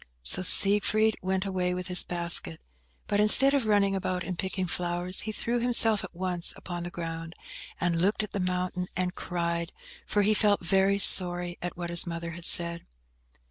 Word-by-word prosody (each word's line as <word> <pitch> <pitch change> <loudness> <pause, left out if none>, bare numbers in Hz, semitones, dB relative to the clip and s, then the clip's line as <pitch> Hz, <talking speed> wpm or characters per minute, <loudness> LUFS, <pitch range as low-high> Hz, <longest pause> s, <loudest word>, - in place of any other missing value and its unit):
So 65 - +5
Siegfried 210 +3 +3
went 190 +1 -3
away 180 -2 -3
with 180 -1 -6
his 180 -1 +4
basket; 170 - +3 0.5
but 205 - -2
instead 260 +6 +5
of 270 -6 -1
running 200 -2 +1
about 185 -1 -4
and 185 - -6
picking 190 +1 -4
flowers, 175 +1 -2
he 220 - -5
threw 235 +3 -3
himself 230 -3 +3
at 185 -2 -11
once 180 -1 -3
upon 175 -1 -7
the 175 - -6
ground, 165 -1 -8 0.4
and 170 -1 -1
looked 205 +3 0
at 210 - -8
the 200 - -5
mountain, 180 0 -3
and 180 0 -2
cried, 170 -1 -4 0.4
for 205 - 0
he 215 +2 +2
felt 205 -4 +1
very 195 +2 +1
sorry 175 -2 +1
at 175 0 -7
what 175 -1 -6
his 170 +1 +7
mother 170 0 -6
had 170 0 -9
said. 170 0 +2
180 Hz, 180 wpm, -26 LUFS, 175-200 Hz, 0.5 s, his